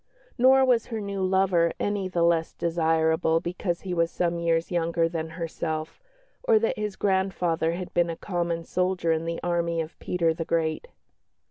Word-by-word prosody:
Nor 265 +1 +5
was 245 -3 +2
her 225 -2 -4
new 200 -1 -4
lover 185 -3 +2
any 205 -2 -1
the 175 -2 0
less 170 -1 +2
desirable 160 -1 +1
because 175 0 -3
he 185 -2 -4
was 170 -1 +1
some 170 -1 -1
years 165 0 0
younger 165 -1 +1
than 165 -1 -4
herself, 160 -2 -4 0.4
or 475 -3 +4
that 460 +1 +1
his 210 -2 -3
grandfather 190 -4 0
had 180 +1 -6
been 175 -1 +2
a 165 - -3
common 170 -2 -2
soldier 180 -1 0
in 160 0 0
the 165 0 -3
army 170 -1 0
of 160 0 -5
Peter 170 -2 0
the 165 - -4
Great. 160 -1 -1
170 Hz, 170 wpm, -26 LUFS, 165-190 Hz, 0.4 s, Nor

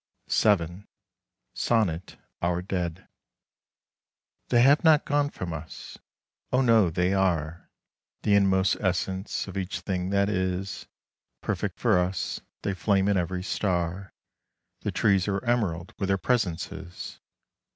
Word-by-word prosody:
VII. 95 -2 +2 0.7
SONNET: 95 -7 0 0.2
OUR 90 +1 0
DEAD 90 -1 -3 1.4
They 120 -1 +5
have 145 +5 +5
not 155 -3 +5
gone 145 0 +1
from 90 - -5
us. 80 0 -8 0.5
O 130 - +3
no! 115 -7 +5
they 90 +3 +1
are 85 -4 0 0.5
The 105 - +3
inmost 95 -1 +3
essence 95 +1 -1
of 95 - -8
each 90 -2 -3
thing 90 -1 -2
that 100 0 +2
is 95 -1 -2 0.5
Perfect - - -2
for 90 - +3
us; 90 +2 -2 0.2
they 100 - 0
flame 95 +2 +2
in 100 - +3
every 90 0 -1
star; 90 -1 -1 0.7
The - - -3
trees 100 -4 +2
are 100 +3 -1
emerald 95 -8 0
with 95 - -1
their 95 0 +2
presences. 95 -5 -2
95 Hz, 125 wpm, -27 LUFS, 90-100 Hz, 1.4 s, They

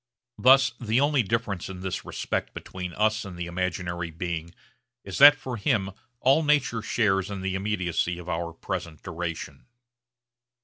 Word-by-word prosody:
Thus 130 -1 +6
the 115 0 +1
only 145 -1 +3
difference 110 -4 -2
in 95 -1 -8
this 95 -1 -3
respect - - -3
between 90 -1 -6
us 110 0 +1
and 95 -4 -8
the 85 - -3
imaginary 85 -1 -3
being 85 0 -4 0.5
is - - -5
that 145 +1 +10
for 130 -3 -6
him 100 -3 0 0.3
all 135 +5 +5
nature 145 -7 +2
shares 105 -3 +1
in 100 -2 -5
the 95 0 -2
immediacy 90 -3 -1
of 90 0 -10
our 85 -1 -2
present 85 -2 -6
duration. 85 - -6
95 Hz, 150 wpm, -26 LUFS, 85-115 Hz, 0.5 s, that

